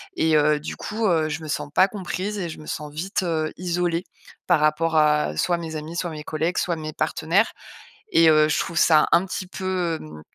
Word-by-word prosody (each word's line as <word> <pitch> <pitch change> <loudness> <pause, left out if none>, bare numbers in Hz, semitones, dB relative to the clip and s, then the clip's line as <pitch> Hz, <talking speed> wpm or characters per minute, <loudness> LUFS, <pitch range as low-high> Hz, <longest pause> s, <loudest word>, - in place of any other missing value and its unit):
et 160 -1 +2
heu, 150 0 +3
du 150 - -6
coup, 220 +1 -3
heu, 160 -4 +2
je 155 +1 -4
me - - -7
sens 145 - -3
pas 185 - +5
comprise 200 +1 -4
et 175 -3 -3
je 160 - -8
me 155 - -11
sens 150 0 -5
vite, 190 +5 -2
heu, 160 -3 -1
isolée. 175 -1 -1 0.4
Par - - +4
rapport 155 +2 +1
à 150 - +2
soit 175 - +1
mes 165 -2 -6
amis, 155 +2 -7
soit 175 0 -2
mes 155 -2 -7
collègues, 160 +4 -2
soit 175 -1 0
mes 155 -1 -6
partenaires 160 +7 +1 0.6
et 165 -1 +6
heu, 155 -1 +5
je - - +1
trouve 170 - -3
ça 155 -1 +5
un 170 +3 +4
petit 185 0 -5
peu, 180 -3 -2
hem, 75 0 -11
165 Hz, 220 wpm, -23 LUFS, 155-180 Hz, 0.6 s, et